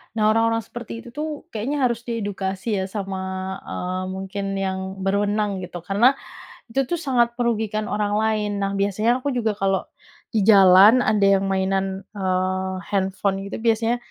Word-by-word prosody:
Nah 215 - 0
orang-orang 225 0 +2
seperti 240 +3 -9
itu 240 - -11
tuh 300 +4 -4 0.2
kayaknya 235 +7 -2
harus 235 -1 0
diedukasi 205 -2 -2
ya 190 - -1
sama, 195 -1 -4 0.5
eee, 185 +1 -3
mungkin 195 +1 -4
yang 190 -1 -2 0.3
berwenang 205 0 0
gitu 175 -1 -8
karena 220 +9 +3 0.5
itu 270 +4 +1
tuh 345 - 0
sangat 240 -5 +1
merugikan 220 -3 -1
orang 205 -1 0
lain. 215 -1 0
Nah 195 0 0
biasanya 215 +5 +1
aku 285 - -1
juga 225 -3 0
kalau 195 -1 +1 0.5
di 215 - +2
jalan 200 +4 +8
ada 210 -2 +2
yang 195 - -2
mainan 190 0 +1 0.3
eee, 185 -1 -1 0.2
handphone 195 0 0
gitu 200 - -5
biasanya 230 +1 +1
205 Hz, 155 wpm, -23 LUFS, 195-225 Hz, 0.5 s, jalan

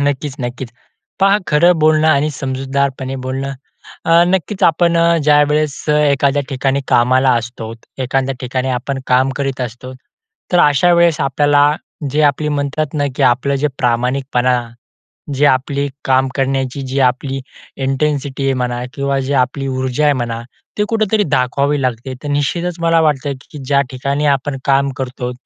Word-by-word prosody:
नक्कीच, 145 -1 -1
नक्कीच. 120 0 -5 0.5
पहा 195 +1 +4
खरं 170 +4 +4
बोलणं 155 0 +3
आणि 150 0 +2
समजूतदारपणे 135 0 -2
बोलणं, 135 +1 -3 0.5
अ, 165 +1 +6
नक्कीच 190 +2 -1
आपण 170 0 +3 0.3
ज्यावेळेस 150 0 +3
एखाद्या 145 -1 +2
ठिकाणी 135 0 0
कामाला 130 +2 +3
असतो, 115 -1 -8 0.2
एखाद्या 135 +1 -1
ठिकाणी 130 +1 -2
आपण 135 +2 -4
काम 130 +1 +3
करीत 135 -2 -2
असतो. 125 +1 -6 0.6
तर, 175 - +4
अशा 150 +5 +4
वेळेस 170 -3 +3
आपल्याला, 145 +1 +3 0.5
जे 150 +2 +1
आपली 150 +1 +2
म्हणतात 145 +1 -2
ना, 145 -1 0
की - - 0
आपलं 130 +3 +2
जे 150 - +3
प्रामाणिकपणा, 125 +1 +1 0.8
जे 145 +2 +3
आपली 140 +1 +1 0.2
काम 130 0 +2
करण्याची 135 0 -1
जी 135 +1 0
आपली 135 +1 -5 0.5
इंटेन्सिटी 140 0 -1
आहे 135 -1 +1
म्हणा 120 0 -2
किंवा 140 -1 -1
जे 145 - -1
आपली 135 +1 -6
ऊर्जा 130 +2 -1
आहे 145 - +5
म्हणा, 115 -1 -3 0.4
ती 210 - +2
कुठेतरी 220 -2 +1
दाखवावी 140 +3 0
लागते. 130 +1 -3
तर, 145 - -5
निश्चितच 155 +5 -1
मला 165 0 +3
वाटतं 145 -3 +1 0.2
की 155 - -9
ज्या 140 +1 +2
ठिकाणी 140 +3 -2
आपण 135 +1 -5
काम 140 0 +2
करतो, 125 -1 -4
140 Hz, 150 wpm, -16 LUFS, 130-150 Hz, 0.8 s, अ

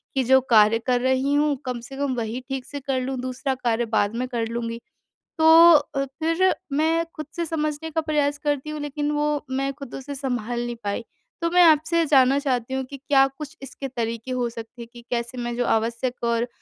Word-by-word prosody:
कि 265 - +2
जो 265 +2 +5
कार्य 215 +1 +6
कर 245 -1 +2
रही 260 +2 +1
हूँ 295 0 +2
कम 250 -1 -3
से 270 - -9
कम 280 -3 -1
वही 230 +1 -3
ठीक 270 -1 -4
से 285 - -7
कर 265 -1 -2
लूँ, 260 +1 -3
दूसरा 255 +1 -2
कार्य 240 -2 0
बाद 220 -1 0
में 255 +1 -2
कर 235 -3 -2
लूँगी। 230 0 -4 0.6
तो 320 0 +4 0.3
अ, 275 -1 0
फ़िर 330 +7 +1 0.2
मैं 325 +3 +2
खुद 310 -2 -6
से 340 -1 -1
समझने 305 0 -2
का 320 - 0
प्रयास 295 -2 0
करती 290 0 -2
हूँ 305 0 -5
लेकिन 295 0 -2
वो 295 0 -1
मैं 275 +1 -1
खुद 275 -3 -9
उसे 280 +1 -6
सँभाल 245 -3 -3
नहीं 240 0 -4
पाई। 200 +3 -2 0.4
तो 335 - +1
मैं 360 0 +5
आपसे 320 +1 +4
ये 330 - +3
जानना 270 -2 +4
चाहती 260 -3 -1
हूँ 265 0 -1
कि 275 +2 -9
क्या 270 0 +4
कुछ 300 0 -8
इसके 275 0 -7
तरीके 230 0 -4
हो 245 -2 -1
सकते 230 +1 -10
हैं 230 - -8
कि 240 - -11
कैसे 235 +1 -3
मैं 240 -1 -3
जो 245 0 0
आवश्यक 235 +3 -1
और 235 +1 +1
265 Hz, 215 wpm, -24 LUFS, 240-290 Hz, 0.6 s, कार्य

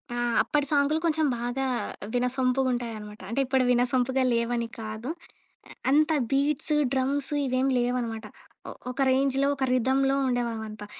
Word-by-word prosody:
ఆ! - - -3 0.2
అప్పటి 295 -1 0
సాంగులు 290 +2 +2
కొంచెం 315 -1 +2
బాగా 245 +3 -2 0.5
వినసొంపుగుంటాయి 250 -1 0
అనమాట. 210 0 -10
అంటే 235 - -1
ఇప్పుడు 260 0 +2
వినసొంపుగా 250 +1 +2
లేవని 235 0 0
కాదు, 220 +3 -5 0.8
అంత 305 +3 +4 0.2
బీట్స్, 290 +2 +1 0.2
డ్రమ్స్ 270 +2 0
ఇవేమీ 260 +1 +1
లేవనమాట. 240 -3 -2 0.4
ఒ - - -6 0.2
ఒక 255 - -5
రేంజ్‌లో 270 +1 +2
ఒక 270 - -1
రిథమ్‌లో 265 +2 +2
ఉండే 245 -1 +1
అవంతా. 215 -1 -7
255 Hz, 130 wpm, -27 LUFS, 240-275 Hz, 0.8 s, అంత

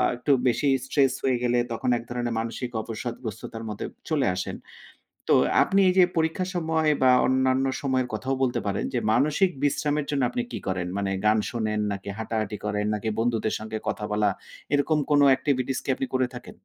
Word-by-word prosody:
একটু 125 +4 -1 0.2
বেশি 135 +4 +1 0.2
স্ট্রেস 135 -1 +2
হয়ে 130 -2 +2
গেলে 120 0 +2
তখন 115 +2 -2
এক 115 - -7
ধরনের 120 -1 -2
মানসিক 115 +2 -4
অবসাদগ্রস্ততার 115 -1 -6
মতো 105 - -5 0.3
চলে 145 -7 +1
আসেন। 90 - -4 0.8
তো - - +7 0.3
আপনি 195 +1 +2
এই 180 - +2
যে 185 - +8
পরীক্ষার 165 +3 0
সময় 160 -2 +1
বা 130 - +6 0.2
অন্যান্য 130 0 +2 0.2
সময়ের 130 -2 0
কথাও 135 +1 -1
বলতে 125 -2 +1
পারেন। 100 0 -1
যে 120 - +2
মানসিক 155 - +3
বিশ্রামের 145 0 0
জন্য 140 -2 0
আপনি 245 - -2
কি - - -3
করেন? 90 -2 -1
মানে 100 -1 -1
গান 110 +1 +4
শোনেন 110 -3 -1
নাকি 100 0 -6
হাঁটাহাঁটি 110 -2 -2
করেন? 105 0 -1
নাকি 105 +1 -3
বন্ধুদের 115 -2 0
সাথে 110 0 -6
কথা 105 - -2
বলা, 105 -1 +2 0.4
এরকম 150 +2 +2
কোনো 145 -1 +5
এক্টিভিটিস 130 -2 -1
কি - - -11
আপনি 135 - -3
করে 130 -1 +2
থাকেন? 125 - -9
125 Hz, 180 wpm, -25 LUFS, 110-145 Hz, 0.8 s, যে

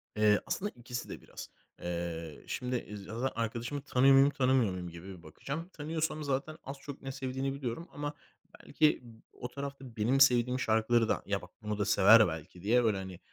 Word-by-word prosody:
Eee, 105 -1 +4
aslında 205 +2 -2
ikisi 120 0 -6
de - - -7
biraz. - - -9 0.3
Eee, 85 -2 -4
şimdi, 125 0 -2
eee, 105 -3 -4
zaten 115 +5 -3
arkadaşımı 120 +5 -3
tanıyor 135 +1 +4
muyum 135 +1 +7
tanımıyor 130 -6 +2
muyum 90 -1 -5
gibi 85 +1 -10
bakacağım. 145 - -6
Tanıyorsam 155 0 -2
zaten 140 +3 -2
az 135 +1 -7
çok 140 0 -9
ne 135 - -5
sevdiğini 135 0 -3
biliyorum 140 +4 -4
ama 145 0 -4 0.5
belki 155 -1 +2
b 115 -2 -15
o 125 - -6
tarafta 135 -2 -7
benim 125 +6 +2
sevdiğim 125 -1 +5
şarkıları 110 +1 +2
da - - 0
ya 100 -1 -1
bak 90 - -12
bunu 105 -1 -3
da 105 - 0
sever 105 +2 +7
belki 80 +2 -7
diye 120 +5 +3
böyle, 105 -3 +2
hani, 95 -1 -7
120 Hz, 185 wpm, -31 LUFS, 105-135 Hz, 0.5 s, muyum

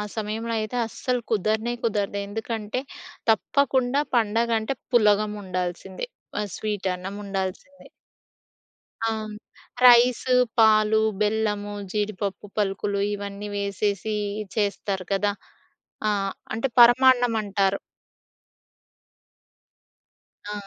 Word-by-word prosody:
సమయంలో 220 +1 -3
అయితే 215 +3 -4
అస్సలు 250 +2 -2
కుదరనే 220 +3 +1
కుదరదు. 205 -3 -1
ఎందుకంటే 220 +2 -3 0.5
తప్పకుండా 260 +3 +1
పండగ 230 +1 +2
అంటే 220 +5 -3 0.2
పులగం 210 -2 +4
ఉండాల్సిందే. 185 - -4 0.3
ఆ - - -1
స్వీట్ 210 -3 -3
అన్నం 185 +2 -7
ఉండాల్సిందే. 195 +8 -5 1.2
ఆ! - - +2 0.8
రైస్, 245 +1 +6 0.3
పాలు, 220 -1 +5 0.2
బెల్లము, 210 -1 0 0.2
జీడిపప్పు 205 -1 -3
పలుకులు 200 0 0
ఇవన్నీ 200 0 -6
వేసేసి 200 +1 -1 0.4
చేస్తారు 200 -2 -1
కదా! 205 +1 +1 0.8
ఆ! - - +3 0.4
అంటే 230 +5 0
పరమాన్నం 245 -1 +6
అంటారు. 195 -1 +1 2.7
ఆ! - - -3
210 Hz, 85 wpm, -25 LUFS, 200-230 Hz, 2.7 s, రైస్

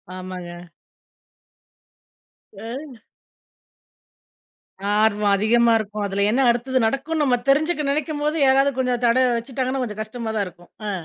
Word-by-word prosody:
ஆமாங்க. 180 -1 -8 1.9
அ. 240 +5 -8 2.0
ஆர்வம் 210 -1 +2
அதிகமா 230 +3 +3
இருக்கும். 210 0 -4
அதில 200 +1 0
என்ன 260 - +2
அடுத்தது 255 +2 +1
நடக்குனு 295 +5 -1
நம்ம 250 -3 +2
தெரிஞ்சுக்க 300 +1 +2
நெனைக்கும்போது 300 +1 -1
யாராவது 270 +1 +4
கொஞ்சம் 250 -1 0
தட 240 +2 +4
வச்சுட்டாங்கன்னா, 260 +2 -3
கொஞ்சம் 215 -2 -5
கஷ்டமா 225 +1 -6
தான் 205 -2 0
இருக்கும். 175 0 -15 0.2
அ. - - -1
240 Hz, 115 wpm, -22 LUFS, 210-270 Hz, 2.0 s, யாராவது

